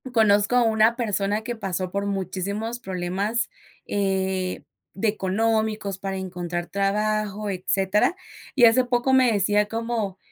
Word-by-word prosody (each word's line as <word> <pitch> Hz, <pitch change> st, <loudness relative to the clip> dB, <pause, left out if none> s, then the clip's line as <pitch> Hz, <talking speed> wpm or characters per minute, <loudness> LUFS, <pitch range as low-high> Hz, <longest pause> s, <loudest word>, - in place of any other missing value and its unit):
Conozco 210 Hz, 0 st, +4 dB
a 250 Hz, -, +5 dB
una 220 Hz, 0 st, +3 dB
persona 210 Hz, -2 st, -1 dB
que 240 Hz, +1 st, -4 dB
pasó 190 Hz, -4 st, -3 dB
por 200 Hz, +1 st, -2 dB
muchísimos 200 Hz, +4 st, -3 dB
problemas, 195 Hz, +4 st, -2 dB, 0.4 s
eh, 190 Hz, -2 st, -1 dB, 0.3 s
de 195 Hz, +4 st, -1 dB
económicos, 215 Hz, 0 st, 0 dB
para 195 Hz, 0 st, -3 dB
encontrar 175 Hz, -2 st, -4 dB
trabajo, 210 Hz, +2 st, -1 dB
etcétera, 195 Hz, -, +1 dB, 0.4 s
y 245 Hz, -4 st, +7 dB
hace 235 Hz, +3 st, +5 dB
poco 245 Hz, +1 st, +1 dB
me 260 Hz, -2 st, +5 dB
decía 205 Hz, 0 st, +2 dB
como, 225 Hz, -3 st, -3 dB
205 Hz, 130 wpm, -24 LUFS, 190-225 Hz, 0.4 s, y